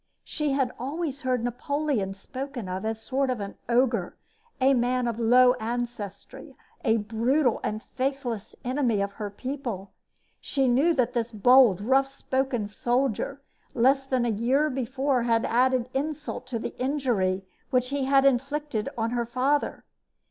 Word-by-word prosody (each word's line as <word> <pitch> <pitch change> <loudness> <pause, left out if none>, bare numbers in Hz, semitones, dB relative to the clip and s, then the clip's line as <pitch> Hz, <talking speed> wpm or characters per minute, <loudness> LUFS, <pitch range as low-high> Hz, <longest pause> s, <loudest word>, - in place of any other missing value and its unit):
She 300 -3 -2
had 265 -2 +1
always 285 +2 -3
heard 255 -2 0
Napoleon 245 -4 -1
spoken 255 +2 -6
of 185 +2 -4
as 220 0 -1
a - - -17
sort 270 +3 0
of 205 -6 -3 0.2
ogre 235 -6 +1 0.4
a 270 +1 +5
man 250 0 +1
of 235 -1 -3
low 250 +2 +6
ancestry, 240 - -5 0.3
a 225 - +3
brutal 235 +5 +1
and 215 +1 -3
faithless 255 -5 -3
enemy 250 -4 +1
of 200 0 -1
her 205 0 -5
people. 235 -4 -5 0.5
She 270 -2 0
knew 280 +8 +3
that 250 -2 +1
this 235 -1 -1
bold, 230 -2 +5
rough 265 +5 +3
spoken 265 -4 -2
soldier 250 +4 -1 0.3
less 265 +3 +4
than 260 -2 0
a - - +1
year 255 +8 +1
before 265 +1 0
had 230 -1 +2
added 250 0 +2
insult 300 +2 -3
to 250 -2 -2
the 225 - -5
injury 240 -9 0 0.2
which 250 -1 +1
he 280 -1 -1
had 275 0 +4
inflicted 275 -2 0
on 225 0 0
her 240 -1 -1
father. 260 +5 0
250 Hz, 150 wpm, -26 LUFS, 225-270 Hz, 0.5 s, low